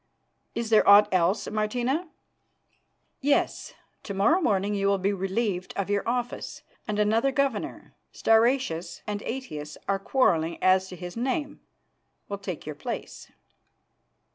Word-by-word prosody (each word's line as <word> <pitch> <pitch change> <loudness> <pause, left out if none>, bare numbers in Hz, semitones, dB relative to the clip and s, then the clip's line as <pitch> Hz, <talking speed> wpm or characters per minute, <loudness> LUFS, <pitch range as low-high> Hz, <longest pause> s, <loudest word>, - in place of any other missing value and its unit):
Is 230 -1 -3
there 215 -2 +5
aught 205 +1 +8
else, 185 +3 +2
Martina?" 245 +10 -1 1.1
"Yes. 285 +1 0 0.3
To 200 - -6
morrow 295 - +3
morning 205 - +1
you 200 -1 0
will 200 0 +3
be 195 +2 0
relieved 195 -1 -2
of 200 0 -1
your 200 -1 +2
office, 245 0 -3 0.2
and 210 -2 -2
another 220 +5 +2
governor 270 -5 -2 0.2
Stauracius 225 -7 +1
and 205 -1 -3
Aetius 155 - -6
are 195 0 +1
quarrelling 170 -8 +1
as 185 0 +3
to 185 - -9
his 175 0 -8
name 275 +5 -2 0.7
will 200 -1 -4
take 185 -4 -6
your 155 - -4
place." 145 - -7
205 Hz, 135 wpm, -26 LUFS, 190-245 Hz, 1.1 s, aught